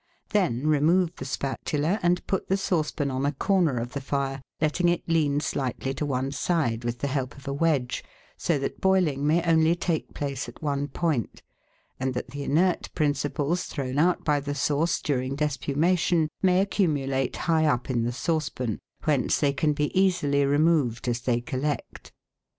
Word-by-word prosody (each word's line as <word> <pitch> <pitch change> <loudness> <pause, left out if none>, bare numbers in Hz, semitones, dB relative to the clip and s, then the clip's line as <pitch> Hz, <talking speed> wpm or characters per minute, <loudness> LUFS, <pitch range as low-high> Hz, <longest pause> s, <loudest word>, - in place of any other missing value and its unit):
Then 150 - +1
remove 160 +4 +3
the 130 - -6
spatula, 145 +7 -1
and 175 0 +1
put 190 - -1
the 195 - +2
sauce 175 -5 0
pan 145 -3 -2
on 130 +1 -2
a 145 - +2
corner 165 -2 +2
of 120 +2 -4
the 140 - -3
fire, 135 0 -2 0.2
letting 160 +3 +2
it 175 - -1
lean 150 -4 +2
slightly 135 -2 -2
to 150 +2 -3
one 135 0 -1
side 140 -6 0
with 120 0 -2
the 140 - 0
help 135 -1 -3
of 140 0 -13
a 140 - -1
wedge, 140 -5 0 0.3
so 165 - 0
that 140 - -4
boiling 170 -7 +2
may 165 +3 +3
only 165 0 +4
take 170 -2 -2
place 140 -2 -3
at - - -14
one 145 -1 -1
point, 145 -5 -2 0.6
and 130 0 -1
that 125 - -4
the 145 +2 -5
inert 170 +6 +1
principles 150 +2 0
thrown 135 -1 -3
out 175 +3 +2
by 150 -2 +3
the 145 0 -4
sauce 145 +4 +1
during 135 -5 -1
despumation 155 +4 +1
may 185 -1 +4
accumulate 140 -10 0
high 160 -2 +3
up 125 -4 +1
in 125 -3 0
the 120 +1 0
sauce 155 +4 -1
pan, 120 -5 -3 0.2
whence 145 -5 +2
they 140 -2 +2
can 150 +3 +1
be 145 0 -2
easily 175 -7 +3
removed 145 -5 +2
as 120 0 0
they 120 -1 +1
collect. 135 +4 -4
145 Hz, 180 wpm, -26 LUFS, 135-165 Hz, 0.6 s, only